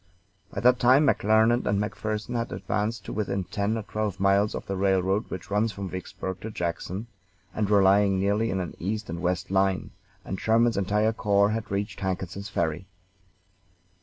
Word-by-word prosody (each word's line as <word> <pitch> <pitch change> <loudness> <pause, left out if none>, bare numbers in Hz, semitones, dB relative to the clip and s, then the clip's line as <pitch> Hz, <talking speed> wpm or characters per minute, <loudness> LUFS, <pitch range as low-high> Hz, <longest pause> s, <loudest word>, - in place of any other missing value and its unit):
By 100 - -4
that 125 +2 +5
time 130 +4 +5
McClernand 110 -1 +3
and 100 - +2
McPherson 105 +3 -3
had 115 0 -2
advanced 105 +3 -2
to - - -5
within 100 -2 -1
ten 100 +5 -1
or 110 - -4
twelve 105 -2 -3
miles 100 +2 +3
of - - -5
the 95 - -3
railroad 95 +1 +1
which 95 +1 -7
runs 105 +2 +2
from 100 -2 -6
Vicksburg 95 0 -6
to 110 - -5
Jackson, 90 +2 -4 0.5
and 105 -2 -1
were 100 -2 +5
lying 100 0 +4
nearly 105 +4 +1
in 95 - -1
an 90 -3 -4
east 105 +1 -3
and 85 0 -5
west 90 0 -1
line; 95 -1 +1 0.3
and 95 - -4
Sherman's 115 +1 +3
entire 105 +3 +1
corps 100 -1 +2
had 110 0 -3
reached 100 +2 -3
Hankinson's 95 +1 -4
Ferry. 80 +3 -2
100 Hz, 175 wpm, -26 LUFS, 95-110 Hz, 0.5 s, that